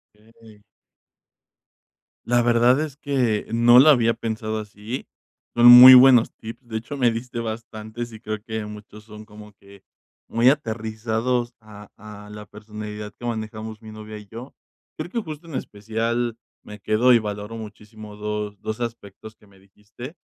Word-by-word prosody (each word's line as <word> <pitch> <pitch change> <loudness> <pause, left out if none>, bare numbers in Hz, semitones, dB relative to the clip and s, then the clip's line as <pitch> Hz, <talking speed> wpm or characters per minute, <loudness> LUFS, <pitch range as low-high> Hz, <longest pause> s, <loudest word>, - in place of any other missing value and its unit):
Okey. 110 0 -20 1.6
La 120 0 +2
verdad 120 +3 +3
es 150 -3 -6
que 130 -8 -1
no 120 +1 +6
la 155 +3 +7
había 115 -4 +2
pensado 110 -1 -4
así. 105 +4 -8 0.5
Son 120 - +3
muy 125 +1 +11
buenos 125 -2 +6
tips. 115 +3 -11
De 110 - -4
hecho, 115 +6 -7
me 120 -3 +2
diste 120 +1 -6
bastantes 110 0 -7
y 110 - -11
creo 110 -1 -6
que 110 -1 -5
muchos 105 0 -12
son 105 0 -12
como 105 -1 -15
que 100 0 -19 0.4
muy 120 +3 +3
aterrizados 115 -1 -2
a 105 -1 -14
a 105 0 -12
la 105 0 -10
personalidad 105 0 -9
que 120 - -10
manejamos 110 -1 -6
mi 110 -1 -12
novia 110 0 -10
y 105 -1 -13
yo. 115 +6 -11 0.4
Creo 155 +3 -6
que 230 +3 -3
justo 160 -1 -10
en 155 - -9
especial 115 +2 -3 0.2
me 105 0 -12
quedo 110 +5 +3
y 120 - +5
valoro 105 0 -6
muchísimo 105 0 -11
dos 105 -1 -5
dos 110 +2 -5
aspectos 110 -2 -8
que 105 - -25
me 95 -1 -22
dijiste. 105 - -13
110 Hz, 160 wpm, -22 LUFS, 105-120 Hz, 1.6 s, muy